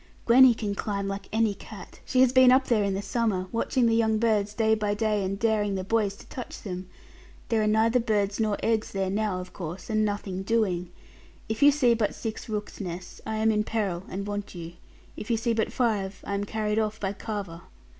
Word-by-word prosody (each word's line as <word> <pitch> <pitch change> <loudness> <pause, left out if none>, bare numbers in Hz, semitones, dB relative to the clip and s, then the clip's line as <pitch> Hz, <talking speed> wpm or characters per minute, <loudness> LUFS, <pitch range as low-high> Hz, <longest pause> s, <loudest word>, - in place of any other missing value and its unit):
'Gwenny 250 0 +7
can 210 -3 -3
climb 200 -1 -3
like 195 0 -5
any 220 -1 +2
cat. 200 - -12
She 255 - +2
has 260 -1 +5
been 260 -1 +7
up 260 +1 +5
there 225 -5 +2
in 200 -1 0
the 195 - -3
summer, 200 -2 0
watching 240 +2 +1
the 230 - +3
young 220 -1 +2
birds, 210 -2 +1
day 220 -1 +3
by 210 -1 0
day, 210 -1 0
and 195 +1 -2
daring 210 -2 +1
the 190 - -2
boys 205 0 0
to - - -15
touch 250 - -8
them. 185 -2 -6 0.6
There 225 -2 +2
are 215 - +1
neither 220 +3 +3
birds, 210 -3 0
nor 215 -2 +1
eggs 225 -1 0
there 190 -1 -1
now, 205 -2 -1
of 180 0 -9
course, 175 +4 -6
and 215 0 +2
nothing 205 -2 -2
doing. 195 -5 0 0.6
If 220 0 -3
you 285 - +8
see 270 -5 +4
but 220 -3 0
six 225 0 -6
rooks' 210 0 -4
nests; 180 -1 -7
I 220 - -2
am 220 +1 +2
in 210 -1 +1
peril 205 -6 -2
and 195 +1 -4
want 205 -1 -5
you. 170 -1 -7 0.4
If 210 - -8
you 230 - +2
see 230 +1 0
but 220 -1 0
five, 205 -6 -1
I - - -3
am 200 0 -1
carried 215 0 -1
off 215 0 -1
by 195 -1 -2
Carver.' 200 -6 -5
210 Hz, 220 wpm, -27 LUFS, 195-225 Hz, 0.6 s, you